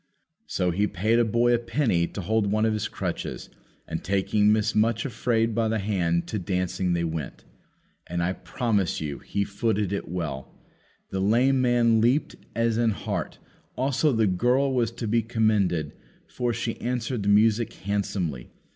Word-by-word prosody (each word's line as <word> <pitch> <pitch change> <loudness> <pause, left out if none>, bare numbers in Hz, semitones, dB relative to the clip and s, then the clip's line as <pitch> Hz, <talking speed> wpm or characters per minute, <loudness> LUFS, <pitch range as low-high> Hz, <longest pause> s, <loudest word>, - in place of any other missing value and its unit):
So 90 -1 0
he 100 +5 +1
paid 110 +7 +1
a - - +5
boy 120 +2 +2
a 120 - +3
penny 115 - +1
to 100 - -6
hold 110 +3 +1
one 110 +1 +2
of 110 - +2
his 110 0 -1
crutches, - - -5 0.4
and, - - -4
taking 105 +2 +2
Miss 105 -1 +2
Much 115 +2 +2
afraid 115 -2 0
by 115 0 +1
the 110 0 0
hand, 90 -5 0
to 110 - -2
dancing 90 0 -1
they 85 0 0
went. 80 -3 -4 0.6
And, 85 0 -2
I 90 +2 0
promise 95 +2 -1
you 75 -2 -4
he 100 - -2
footed 100 -1 -1
it 100 - -4
well; 80 -7 -5 0.6
the 95 - -2
lame 125 +7 +3
man 120 -2 +3
leaped 125 +6 +2 0.2
as 115 -1 +1
an 120 -1 +3
hart; 105 - -3 0.4
also 135 +3 +2
the 110 -3 +2
girl 125 +8 +2
was 120 -3 +1
to 115 -1 -5
be 115 +2 +2
commended, 105 -9 +1 0.3
for 125 -1 -2
she 115 0 -3
answered 125 -1 -2
the 100 - 0
music 110 +2 +4
handsomely. 95 -9 -3
110 Hz, 170 wpm, -26 LUFS, 95-115 Hz, 0.6 s, a